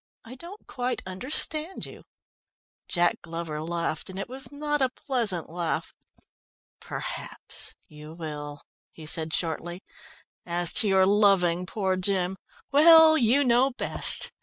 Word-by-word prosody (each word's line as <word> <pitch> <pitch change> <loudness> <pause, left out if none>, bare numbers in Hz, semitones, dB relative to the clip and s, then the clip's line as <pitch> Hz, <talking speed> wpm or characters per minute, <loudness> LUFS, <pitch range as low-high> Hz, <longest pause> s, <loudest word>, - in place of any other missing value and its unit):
"I 230 - -11
don't 345 +10 -12
quite 250 0 -4
understand 300 - 0
you." - - -13 0.8
Jack 175 -1 0
Glover 165 -2 -6
laughed, 170 +1 -4
and 190 - -9
it 195 - -5
was 265 +3 -6
not 295 0 -3
a 260 - +2
pleasant 235 - -2
laugh. 170 0 -4 0.9
"Perhaps - - -7
you 150 +1 -13
will," 145 -3 -8 0.3
he 160 - -12
said 160 +1 +2
shortly. 175 +3 -3 0.6
"As 175 0 +1
to 220 - 0
your 190 -1 +3
loving 190 -3 +2
poor 190 -2 -2
Jim 185 0 -2 0.3
well, 320 +2 +7
you 255 +1 +2
know 250 +1 +3
best. - - +6
190 Hz, 130 wpm, -25 LUFS, 170-255 Hz, 0.9 s, well